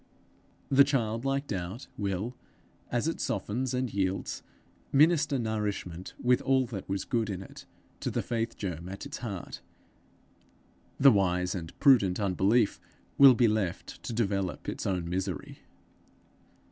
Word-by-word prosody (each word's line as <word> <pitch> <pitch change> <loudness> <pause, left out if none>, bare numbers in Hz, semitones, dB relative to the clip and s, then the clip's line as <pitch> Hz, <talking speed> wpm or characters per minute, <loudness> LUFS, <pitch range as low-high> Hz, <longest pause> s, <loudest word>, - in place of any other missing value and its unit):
The 140 +1 +7
childlike 135 +1 0
doubt 95 +3 -5
will, 100 +4 -3 0.6
as - - 0
it - - -2
softens 125 +5 -2
and 125 -2 -2
yields, 95 -1 -1 0.5
minister 150 0 +4
nourishment 105 -6 -3
with 125 0 +3
all 130 -1 +2
that 105 -6 -7
was 95 0 -2
good 115 -4 0
in 95 -1 -4
it - - -13 0.3
to - - -2
the - - -2
faith 115 -1 -2
germ 90 -3 -5
at 100 - -7
its - - -6
heart; 100 -7 -6 1.4
the 135 0 +8
wise 90 -3 +1
and 85 -4 -7
prudent 115 -11 +5
unbelief 100 +3 +2 0.4
will 135 -2 +9
be 120 0 +4
left 105 -5 -2
to - - -6
develop 100 -5 -1
its - - -3
own 90 -3 -1
misery. 90 -1 -4
105 Hz, 135 wpm, -29 LUFS, 95-125 Hz, 1.4 s, will